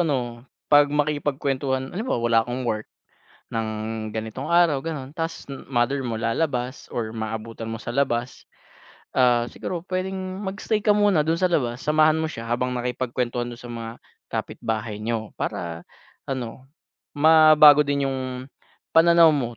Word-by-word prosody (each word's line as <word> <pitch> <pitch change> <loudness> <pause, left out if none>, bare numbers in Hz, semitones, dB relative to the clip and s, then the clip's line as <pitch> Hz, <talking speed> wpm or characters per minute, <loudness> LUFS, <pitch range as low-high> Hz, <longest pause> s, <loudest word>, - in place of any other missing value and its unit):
ano, 125 -8 -1 0.3
'pag 145 0 +7
makikipagkuwentuhan 140 -2 -1
halimbawa 220 +8 -2
wala 115 -1 +4
kang 125 +1 -3
work 110 -2 -2 0.7
ng 115 -1 -1 0.4
ganitong 110 +5 -5
araw, 170 -5 +4
ganun 145 -4 -5
ta's 165 +1 -4 0.2
mother 135 +2 +1
mo 115 -3 -3
lalabas 125 +2 -2
or 110 -2 -4
maabutan 115 0 -5
mo 115 - -4
sa 120 +1 -6
labas. 125 -3 -1 0.7
Ah, 120 -2 +4
siguro 175 +6 -5
puwedeng 185 +1 -3 0.3
mag-stay 205 +2 -1
ka 210 - +5
muna 205 -7 +3
dun 165 +2 0
sa 185 - +3
labas, 125 -7 0
samahan 155 +1 +3
mo 160 - -1
siya 115 -7 -7
habang 125 +2 0
nakikipagkwentuhan 125 0 -2
dun 120 - -8
sa 120 - -10
mga 115 0 -6 0.3
kapitbahay 110 -1 -4
niyo 110 -1 -3
para 85 -1 -3 0.5
ano, 130 -1 -5 0.5
mabago 155 -1 +8
din 140 -1 0
yung, 130 -1 -4 0.4
pananaw 170 0 +7
mo 120 -6 -2
130 Hz, 140 wpm, -24 LUFS, 120-155 Hz, 0.7 s, mabago